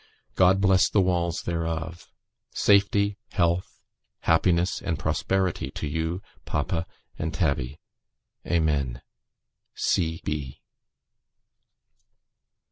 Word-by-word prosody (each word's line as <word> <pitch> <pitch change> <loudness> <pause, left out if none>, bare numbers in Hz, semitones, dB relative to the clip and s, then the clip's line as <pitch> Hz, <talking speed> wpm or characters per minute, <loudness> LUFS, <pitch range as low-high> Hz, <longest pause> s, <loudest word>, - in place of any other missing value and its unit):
God 95 +1 +5
bless 95 -1 +4
the 105 - +2
walls 85 -3 +1
thereof! 85 0 -3 0.4
Safety, 100 0 +3
health, 85 +1 0 0.4
happiness, 85 +2 +2
and 80 - -2
prosperity 95 -1 0
to - - -3
you, 80 +5 -2 0.2
papa, 85 0 -2 0.3
and 80 +1 -1
Tabby. 70 -6 -1 0.7
Amen. 75 -7 0
85 Hz, 75 wpm, -26 LUFS, 80-95 Hz, 0.7 s, God